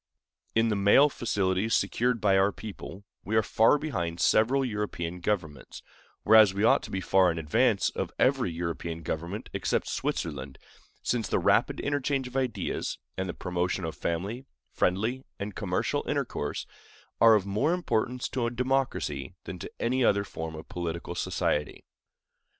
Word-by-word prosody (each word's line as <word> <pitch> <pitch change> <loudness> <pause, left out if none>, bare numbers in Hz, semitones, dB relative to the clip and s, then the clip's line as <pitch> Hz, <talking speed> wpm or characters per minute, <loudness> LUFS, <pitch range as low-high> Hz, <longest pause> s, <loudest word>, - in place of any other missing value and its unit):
In 115 0 +3
the 105 - +1
mail 100 +9 +5
facilities 100 -4 0
secured 120 -1 0
to - - +3
our 95 +1 +4
people, 100 -1 -9 0.2
we 110 - -2
are 110 - +4
far 110 +7 +4
behind 85 - -3
several 130 +5 +3
European 100 -6 -3
governments, 85 -8 -3 0.4
whereas 110 -3 +7
we 100 - 0
ought - - +5
to - - -9
be 95 - -3
far 95 -1 +4
in 85 - -2
advance 75 -2 +2
of - - -3
every - - +2
European 85 0 -4
government 85 +8 -4
except - - -1
Switzerland, 70 -4 -3 0.5
since 115 -4 0
the - - +2
rapid - - +2
interchange 140 -2 -1
of 125 - -12
ideas, 130 -3 -2 0.2
and 95 0 -3
the - - -4
promotion 90 0 -2
of 80 - -4
family, 100 - -3 0.2
friendly, 110 +8 0
and 100 +1 -5
commercial 95 -4 -1
intercourse, - - -2 0.5
are 115 -1 +7
of 100 -3 +1
more 105 +11 +1
importance 125 -8 -1
to 120 -3 -1
a - - 0
democracy 130 +2 -1
than - - -7
to - - -6
any 130 +2 +1
other 100 -3 +3
form 80 -4 -6
of 80 - -9
political 85 -1 -4
society. 75 0 -2
100 Hz, 155 wpm, -28 LUFS, 90-120 Hz, 0.5 s, whereas